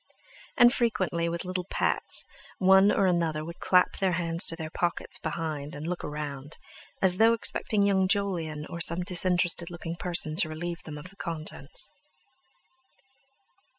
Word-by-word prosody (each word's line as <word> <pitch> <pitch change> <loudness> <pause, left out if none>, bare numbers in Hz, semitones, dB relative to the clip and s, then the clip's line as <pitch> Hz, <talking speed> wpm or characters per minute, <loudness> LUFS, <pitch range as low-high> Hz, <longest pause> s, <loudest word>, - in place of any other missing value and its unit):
And 240 0 +7
frequently, 185 -8 0
with 170 +2 -4
little 180 0 -3
pats, - - +2 0.3
one 190 +2 +6
or 195 - +2
another 165 -4 0
would 170 +1 -9
clap 180 -1 +3
their 190 -2 +1
hands 170 0 0
to 165 - 0
their 160 -2 -6
pockets 175 -1 -1
behind 155 -2 -4
and 145 +2 -7
look 175 +1 -3
round, 145 -1 -6 0.5
as 180 -1 +4
though 225 +2 +5
expecting 215 -2 0
young 190 -2 +3
Jolyon 175 -7 -1
or 170 - -6
some 170 +2 0
disinterested 175 -2 +2
looking 170 -1 -6
person 170 -3 -2
to 165 -4 +4
relieve 170 +2 -5
them 150 -2 -7
of 180 +5 -8
the 195 - -21
contents. 155 -4 -4
170 Hz, 150 wpm, -28 LUFS, 160-185 Hz, 0.5 s, And